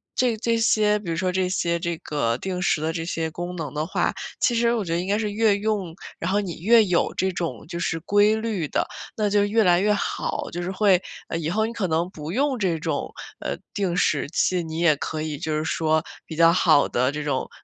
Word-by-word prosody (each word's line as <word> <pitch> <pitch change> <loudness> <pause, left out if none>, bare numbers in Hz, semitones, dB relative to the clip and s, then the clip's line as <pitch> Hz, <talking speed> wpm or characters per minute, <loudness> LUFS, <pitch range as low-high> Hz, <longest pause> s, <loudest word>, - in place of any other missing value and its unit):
这 245 -3 +2
这 230 +1 0
些 210 -1 +3
比 190 -5 -7
如 165 - -1
说 185 +1 0
这 185 0 0
些 170 -2 0
这 170 -1 -2
个 125 -7 -1
定 185 +2 -4
时 160 -3 +1
的 160 +1 -1
这 165 - -3
些 165 -2 -2
功 175 +2 -5
能 160 -5 -5
的 150 +1 -1
话， 175 - 0 0.3
其 240 - +2
实 235 0 +3
我 225 -3 0
觉 165 - -2
得 170 - +1
应 180 - -3
该 205 +1 +2
是 215 -1 -1
越 215 -1 +3
用， 200 -5 -2 0.2
然 175 +3 -2
后 205 - +2
你 175 -6 -6
越 225 +4 +6
有 180 -3 +1
这 190 0 0
种 170 -2 -4
就 170 +1 -5
是 165 -1 -1
规 205 +4 +4
律 220 -7 -2
的， - - -1 0.3
那 210 -2 +1
就 205 0 +3
越 220 +2 +3
来 175 -2 +4
越 210 +2 +3
好。 200 - -2
就 175 - -4
是 180 +2 -3
会， 190 -2 +3 0.3
呃， 165 - -2
以 160 -1 -2
后 220 +5 +1
你 230 - -4
可 200 -5 -1
能 165 +2 0
不 155 -2 -7
用 265 +2 0
这 180 -5 +1
种， 150 -2 -3 0.3
呃， - - -3 0.2
定 190 -4 -1
时 150 -5 +1
器， 180 +2 +1
你 160 0 -5
也 170 -3 +4
可 155 +2 -4
以 155 -2 -3
就 155 -1 -1
是 155 - -1
说 160 0 +1 0.2
比 160 - -8
较 165 +1 +6
好 160 -5 +4
地 125 +2 +1
这 150 +1 -4
种， 145 -3 -2
180 Hz, 260 characters per minute, -24 LUFS, 160-205 Hz, 0.3 s, 越